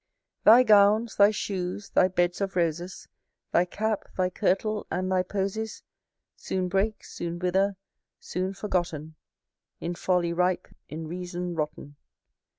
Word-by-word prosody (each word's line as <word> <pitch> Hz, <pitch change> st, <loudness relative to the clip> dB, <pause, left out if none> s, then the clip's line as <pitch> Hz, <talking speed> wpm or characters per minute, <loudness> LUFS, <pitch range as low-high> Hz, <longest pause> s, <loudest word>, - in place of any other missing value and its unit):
Thy 235 Hz, +4 st, +9 dB
gowns, 215 Hz, +1 st, +4 dB
thy 200 Hz, 0 st, +7 dB
shoes, 200 Hz, -1 st, -4 dB
thy 185 Hz, -, +5 dB
beds 175 Hz, 0 st, 0 dB
of 195 Hz, -1 st, -2 dB
roses, 175 Hz, +1 st, -2 dB, 0.4 s
Thy 175 Hz, -, +4 dB
cap, 215 Hz, +3 st, -2 dB
thy 185 Hz, -1 st, +1 dB
kirtle, 210 Hz, +2 st, 0 dB
and 185 Hz, +1 st, -2 dB
thy 185 Hz, -1 st, +3 dB
posies, 200 Hz, +3 st, -3 dB, 0.5 s
Soon 185 Hz, -1 st, -2 dB
break, 200 Hz, +3 st, 0 dB
soon 170 Hz, 0 st, -5 dB
wither, 190 Hz, +3 st, +1 dB, 0.4 s
soon 185 Hz, +1 st, -3 dB
forgotten; 175 Hz, -6 st, -2 dB, 0.7 s
In 170 Hz, -, -3 dB
folly 175 Hz, -1 st, 0 dB
rise, 180 Hz, +1 st, +2 dB, 0.3 s
in 160 Hz, +1 st, -6 dB
reason 180 Hz, +1 st, -4 dB
rotten. 150 Hz, -2 st, -5 dB
185 Hz, 130 wpm, -27 LUFS, 175-200 Hz, 0.7 s, Thy